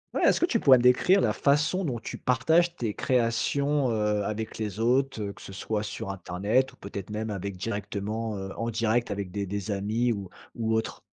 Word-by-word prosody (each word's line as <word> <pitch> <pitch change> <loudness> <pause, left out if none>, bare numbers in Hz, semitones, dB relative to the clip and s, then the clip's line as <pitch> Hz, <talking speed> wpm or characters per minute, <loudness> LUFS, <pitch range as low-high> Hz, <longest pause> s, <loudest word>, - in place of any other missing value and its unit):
Ouais, - - +1
est-ce - - +4
que 345 - +3
tu 230 - +1
pourrais 130 -7 +7
décrire 125 +11 +5
la - - +2
façon 150 +6 +2
dont 125 -6 -2
tu - - -6
partages 160 +8 +2
tes 115 -8 -3
créations, 130 +3 +1
heu, 105 -2 +1
avec 110 +2 -4
les 105 -2 -4
autres, 125 +1 +1
que - - -16
ce 95 - -9
soit 105 +2 -2
sur 105 -2 -5
internet 100 +7 0
ou - - -20
peut-être 100 0 -7
même 110 +1 -3
avec 100 -1 -4
directement 105 +2 -3
heu, 95 -1 -5
en 115 0 -2
direct 115 +1 +1
avec 100 -2 -3
des 100 +2 -3
des 100 +1 -4
amis 110 +5 0
ou 100 -3 -4 0.3
ou 110 -1 -1
autre? 110 0 -2
110 Hz, 200 wpm, -27 LUFS, 100-125 Hz, 0.3 s, pourrais